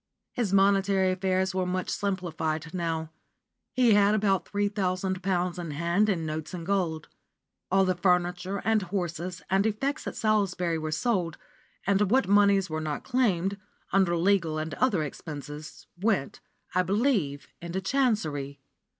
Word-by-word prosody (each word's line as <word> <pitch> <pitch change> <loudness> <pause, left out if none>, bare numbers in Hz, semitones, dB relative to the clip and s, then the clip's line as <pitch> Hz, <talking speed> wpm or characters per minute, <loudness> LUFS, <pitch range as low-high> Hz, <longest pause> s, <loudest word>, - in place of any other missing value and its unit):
His 235 -6 -1
monetary 195 -1 +3
affairs 190 0 0
were 185 -1 0
much 185 0 -2
simplified 165 -5 -2
now: 165 -3 -2 0.6
he 245 -4 +4
had 205 +1 +5
about 200 -3 +1
three 205 0 0
thousand 190 -2 -1
pounds 180 -1 -1
in 170 -2 -5
hand 170 +8 +1
in 170 -5 0
notes 155 +3 -4
and 170 -2 -6
gold. 175 -5 -1 0.6
All 195 +1 +4
the 185 - +2
furniture, 180 +1 0
and 220 -1 +3
horses, 180 -2 -4
and 190 +2 +2
effects 270 +8 -2
at - - -4
Salisbury 190 -6 +1
were 155 0 -3
sold, 175 -1 0 0.5
and 200 0 +2
what 260 +4 +3
moneys 200 -1 +4
were 155 0 -3
not 150 -2 -3
claimed, 200 -7 +1 0.3
under 190 -3 +3
legal 170 -3 +2
and 155 +1 -3
other 210 -11 +1
expenses, 150 0 -8
went, 190 -6 -1 0.3
I 185 - +3
believe, 190 - 0
into 170 +2 -3
Chancery. 185 - 0
185 Hz, 145 wpm, -27 LUFS, 170-200 Hz, 0.6 s, had